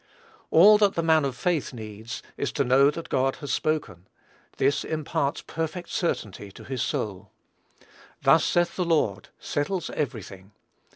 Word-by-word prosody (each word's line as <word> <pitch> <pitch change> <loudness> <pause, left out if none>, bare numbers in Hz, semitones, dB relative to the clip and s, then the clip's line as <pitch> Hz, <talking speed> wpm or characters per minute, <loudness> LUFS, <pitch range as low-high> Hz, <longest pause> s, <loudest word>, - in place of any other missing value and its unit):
All 210 +6 +7
that 205 -2 +3
the 165 - 0
man 160 -2 +4
of 130 -2 -3
faith 165 -5 -1
needs, 110 0 -8
is 140 - -2
to 140 - +1
know 135 +2 +5
that 165 +3 -6
God 130 +1 +1
has 145 - -6
spoken; 150 - -2 0.5
this 140 +2 +2
imparts 145 -2 -2
perfect 165 +2 -4
certainty 105 - -3
to - - -12
his 130 -3 -4
soul. 100 -1 -3 0.9
"Thus - - +5
saith 175 0 +1
the 180 - +1
Lord," 150 - 0
settles 160 +4 -2
every 125 -8 -3
thing. 95 +2 -13
140 Hz, 155 wpm, -26 LUFS, 110-165 Hz, 0.9 s, All